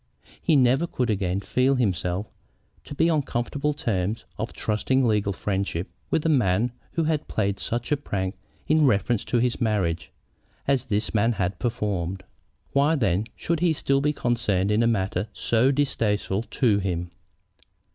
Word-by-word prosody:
He 165 - +3
never 135 +5 +4
could 125 -7 -1
again 95 -2 -1
feel 130 +5 +2
himself 95 -4 0 0.6
to 145 - -8
be 165 - +3
on 160 -3 +3
comfortable 140 +4 -2
terms 110 -6 -2
of 110 +2 -4
trusting 130 +5 +1
legal 105 -2 +1
friendship 95 -3 -2 0.2
with 160 - 0
a - - +4
man 120 - +2 0.2
who 165 - +1
had 155 -1 0
played 100 -2 -1
such 120 +3 -3
a 150 - +3
prank 95 -8 -3 0.3
in 155 -1 +4
reference 115 0 +1
to 120 - 0
his 125 +1 0
marriage 95 -8 0 0.6
as 135 -3 +2
this 105 0 -1
man 115 +2 +3
had 95 -2 -2
performed. 95 -6 -2 0.5
Why, 145 +3 +3
then, 100 - +1
should 170 -1 -1
he 170 -1 +3
still 140 -2 +1
be 150 +1 +2
concerned 110 -8 0
in 105 +2 +3
a 115 - +3
matter 95 -2 0
so 120 +3 +2
distasteful 110 -8 0
to 110 -7 +2
him? 90 -3 -2
115 Hz, 160 wpm, -25 LUFS, 100-135 Hz, 0.6 s, never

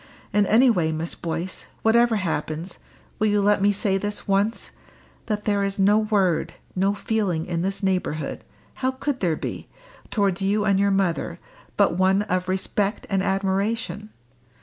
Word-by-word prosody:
And 205 -1 +3
any 235 +5 +5
way, 165 -7 +1
Miss 160 +2 -3
Boyce, 170 +2 -5 0.2
whatever 235 +1 +4
happens, 165 -2 -3 0.4
will 215 - +3
you 205 0 +2
let 205 0 +3
me 205 +1 +4
say 195 -1 +1
this 205 +1 -4
once, 200 +3 0 0.6
that 210 -2 -2
there 205 -1 +1
is 195 0 -1
no 205 +2 +4
word, 200 -6 +1 0.2
no 195 +2 +1
feeling 205 -7 -1
in 170 -2 -2
this 195 +3 -3
neighbourhood 180 -5 -1 0.4
how 260 - +2
could 260 +1 -3
there 170 -4 +1
be? - - -5 0.4
towards 200 -4 0
you 205 +2 +1
and 200 -2 +3
your 200 0 +3
mother, 195 -4 0 0.4
but 195 -4 +3
one 190 +2 +3
of 185 -3 -1
respect 195 +2 -1
and 195 -1 +2
admiration? 195 +2 -1
195 Hz, 160 wpm, -24 LUFS, 185-210 Hz, 0.6 s, any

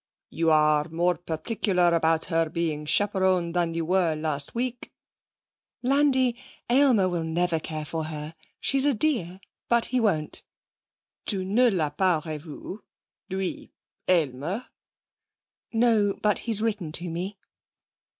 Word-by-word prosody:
'You 165 0 0
are 150 0 +3
more 175 +2 +1
particular 180 +1 0
about 165 -1 +2
her 165 -1 0
being 155 -2 -2
chaperoned 190 -3 +2
than 170 -2 0
you 165 -1 -2
were 175 -2 +1
last 155 0 +1
week.' 245 0 -3 0.9
'Landi, 260 -2 +3 0.4
Aylmer 250 -7 +4
will 175 -2 -2
never 165 +1 0
care 155 -1 -4
for 160 +1 -3
her. 155 0 -6 0.3
She's 275 -1 +3
a 285 -3 +2
dear, 210 - 0 0.3
but 235 -1 +4
he 255 - +3
won't.' 165 -10 0 0.9
'Tu 190 -3 +1
ne 240 +6 +3
l'a 160 -8 -1
pas 165 0 +1
revu? 155 +5 -7 0.5
Lui 190 -1 -4 0.4
Aylmer?' 165 - 0 1.1
'No, 225 -4 +2
but 210 -1 +2
he's 220 -1 +5
written 210 -8 -2
to 175 +2 +1
me.' 180 +5 -4
175 Hz, 130 wpm, -26 LUFS, 160-210 Hz, 1.1 s, he's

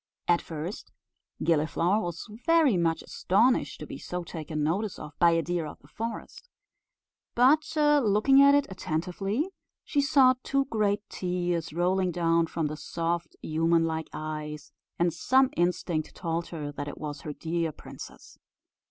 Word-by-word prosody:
At 175 -1 +3
first 165 +4 -6 0.5
Gilliflower 165 +5 +2
was 175 0 -5 0.2
very 325 - +5
much 165 -2 +1
astonished 225 +7 +1
to - - -5
be - - -8
so 180 0 -5
taken 155 -2 -4
notice 190 +7 -1
of 150 - -8
by 170 - +6
a 165 0 +2
deer 175 -2 -2
of - - -9
the 140 - -21
forest; 230 - -7 0.9
but 280 +6 +4
looking 275 -3 +5
at 280 0 +7
it 285 -1 +3
attentively, 190 - -2 0.3
she 285 - +1
saw 275 -3 +5
two 275 +1 0
great 210 -4 0
tears 175 -2 -2
rolling 180 +3 +1
down 165 -1 +2
from 165 0 -2
the 150 +1 -3
soft 170 +2 -3
human 165 +1 +2
like 160 -1 -3
eyes, 150 -1 -6 0.3
and 170 -1 +2
some 260 - +3
instinct 175 -2 -1
told 170 -1 -2
her 150 -4 -5
that 145 0 -6
it 145 - -7
was 145 -2 -6
her 150 - -5
dear 165 +1 -2
princess. - - -12
175 Hz, 150 wpm, -28 LUFS, 160-215 Hz, 0.9 s, at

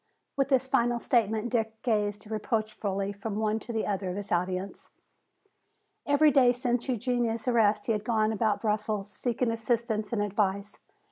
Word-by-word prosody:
With 275 -1 +1
this 265 -2 +3
final 240 -2 +2
statement 230 -1 +1
Dick 225 -2 -1
gazed 210 -3 0
reproachfully 215 -3 -2
from 200 +1 -5
one 215 0 0
to 235 - -7
the 220 -1 -1
other 195 -2 -2
of 180 - -4
his 205 0 -6
audience. 185 +2 -2 1.2
Every 295 +1 +5
day 255 -2 +5
since 245 0 -1
Eugenia's 240 -1 -1
arrest 220 -4 +3
he - - 0
had 210 -2 -1
gone 220 -1 +1
about 220 -1 0
Brussels 210 -2 -1
seeking 240 0 -1
assistance 225 -2 -1
and 215 -3 0
advice. 200 0 -1
220 Hz, 155 wpm, -28 LUFS, 205-240 Hz, 1.2 s, Every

